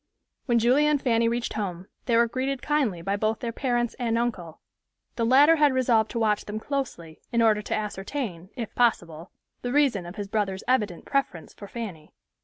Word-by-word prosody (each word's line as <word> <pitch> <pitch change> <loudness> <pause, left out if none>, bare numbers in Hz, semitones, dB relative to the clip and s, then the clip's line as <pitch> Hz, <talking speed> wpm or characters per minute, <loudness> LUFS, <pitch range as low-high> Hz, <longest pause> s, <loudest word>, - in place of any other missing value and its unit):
When 240 -2 +3
Julia 255 +6 +4
and 295 -1 +2
Fanny 230 -3 +2
reached 235 +1 -1
home, 185 -4 -4 0.2
they 235 -2 +2
were 235 0 +4
greeted 260 +2 -3
kindly 260 - 0
by 195 +3 -1
both 215 +1 0
their 235 - -3
parents 240 -1 -1
and 230 -2 0
uncle. 190 -9 -3 0.6
The 230 -1 0
latter 290 +6 +6
had 295 -3 +4
resolved 235 -4 +2
to 235 - -3
watch 215 -2 +1
them 210 +1 -5
closely, 220 - -4
in 235 - +1
order 220 -2 +4
to - - -2
ascertain, 205 -3 -4
if 235 -4 -5
possible, 175 -8 0 0.3
the 245 - -3
reason 255 -11 +2
of 175 - -9
his 205 -2 -5
brother's 195 -2 -2
evident 210 -9 0
preference 275 - -2
for 200 - -11
Fanny. 195 -10 -8
230 Hz, 190 wpm, -26 LUFS, 200-255 Hz, 0.6 s, latter